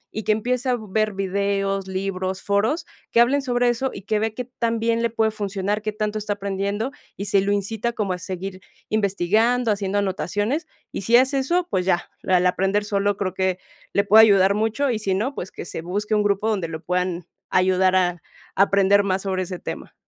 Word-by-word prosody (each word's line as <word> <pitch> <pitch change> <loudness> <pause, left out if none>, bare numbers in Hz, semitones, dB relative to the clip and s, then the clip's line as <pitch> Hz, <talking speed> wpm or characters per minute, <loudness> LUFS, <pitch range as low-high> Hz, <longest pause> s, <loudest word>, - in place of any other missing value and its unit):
y 220 - -3
que - - +3
empiece 250 +4 0
a 250 - +2
ver 215 -1 -1
videos, 195 0 -1
libros, 190 0 -3
foros, 220 +11 +1 0.3
que - - +3
hablen 260 +4 +4
sobre 245 -2 +1
eso, 240 +3 0
y 200 - -9
que 210 +2 0
vea 220 +1 0
qué 250 - -4
tan 230 -1 +1
bien 230 +1 +1
le 235 - +1
puede 220 -1 +1
funcionar, 205 0 -2
qué 215 0 -2
tanto 215 0 -2
está 210 0 -2
aprendiendo, 200 +4 -2 0.3
y 200 - -4
si 200 -1 +3
lo 200 +1 0
incita 215 +3 -1
como 205 -5 -1
a 180 - -5
seguir 185 +1 -6 0.3
investigando, 220 +4 +2
haciendo 200 0 -1
anotaciones. 205 - -1 0.2
Y - - -4
si 230 +5 +5
hace 265 +2 +3
eso, 345 +6 0
pues 185 - +1
ya, 175 -2 +1
la 185 -1 +3
la 180 0 +3
aprender 195 +3 0
solo 200 -1 0
creo 185 -3 -2
que 185 -1 0 0.4
le 200 - +3
puede 220 +3 +7
ayudar 195 -2 +5
mucho, 225 +6 0
y 220 - -1
si 195 -3 0
no, 235 +9 -1
pues, 190 - -6
que - - -8
se 165 - -6
busque 205 +5 -3
un 210 - +3
grupo 205 +1 +1
donde 200 -6 0
lo 160 0 -7
puedan 180 -1 -1 0.2
ayudar 185 0 +3
a 180 -2 +1 0.3
aprender 200 0 +4
más 190 0 -1
sobre 185 -1 -1
ese 180 0 -6
tema. - - -7
200 Hz, 210 wpm, -23 LUFS, 190-220 Hz, 0.4 s, puede